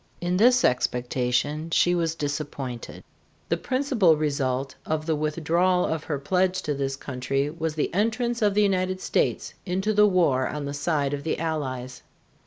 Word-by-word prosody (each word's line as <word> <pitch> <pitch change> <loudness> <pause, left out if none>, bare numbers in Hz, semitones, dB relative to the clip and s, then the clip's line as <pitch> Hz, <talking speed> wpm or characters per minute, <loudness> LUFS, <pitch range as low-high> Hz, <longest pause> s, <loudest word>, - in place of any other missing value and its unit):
In 175 +1 0
this 245 +4 +5
expectation 125 +5 0
she 175 +1 +3
was 165 -2 0
disappointed. 145 -5 -5 0.5
The - - +1
principal 255 - +2
result 135 -3 -1
of 155 +1 -2
the 160 -1 +1
withdrawal 170 +4 +1
of 160 -2 -2
her 150 - -2
pledge 185 +6 0
to 150 - -1
this 135 -1 -2
country 135 +2 -2
was 160 -1 -3
the 155 - -1
entrance 230 +4 0
of 205 -2 +2
the 210 - +4
United 185 -1 0
States - - -1
into 190 +3 -1
the 210 0 +6
war 165 -9 +2
on 150 -1 -4
the 140 - -4
side 145 -1 0
of 145 - -3
the 160 - -2
Allies. 130 -6 -4
155 Hz, 165 wpm, -25 LUFS, 140-185 Hz, 0.5 s, the